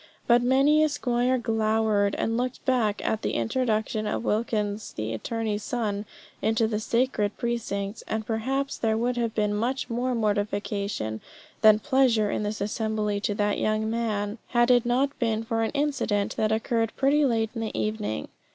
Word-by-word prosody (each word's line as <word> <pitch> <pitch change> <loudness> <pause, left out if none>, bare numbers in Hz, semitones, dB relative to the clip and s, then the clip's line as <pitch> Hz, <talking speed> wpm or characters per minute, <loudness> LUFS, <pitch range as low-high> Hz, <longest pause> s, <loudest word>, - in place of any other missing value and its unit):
But 240 0 +5
many 275 +5 +4
a 310 - +3
squire 250 -3 +1
glowered 220 -3 +1
and 225 - -1
looked 250 +1 -3
black 235 -6 +1
at 220 - 0
the - - -2
introduction 215 - 0
of 210 - -2
Wilkins 210 -2 -1
the 110 +1 -3
attorney's 215 - -2
son 215 -4 -2 0.4
into 220 +1 +2
the 215 -1 -1
sacred 225 -2 0
precincts; 220 -4 -3
and 220 0 -2
perhaps 265 +5 -2
there 220 -1 +1
would 245 +2 0
have 230 -2 -1
been 210 -1 +1
much 245 +4 -1
more 245 +2 0
mortification 205 - -1 0.4
than 215 -1 +7
pleasure 250 -5 +2
in - - -1
this 210 0 -3
assembly 210 0 -1
to 205 0 -1
the 205 0 +1
young 215 0 0
man, 215 -2 -2
had 240 0 +3
it 245 -1 +4
not 270 +4 +1
been 225 -2 0
for 225 0 -1
an 225 - +1
incident 275 -8 0
that 215 0 +1
occurred 225 0 0
pretty 285 +2 +3
late 225 -4 +1
in 230 - -4
the 220 - -3
evening. 210 - -2
220 Hz, 170 wpm, -26 LUFS, 210-245 Hz, 0.4 s, than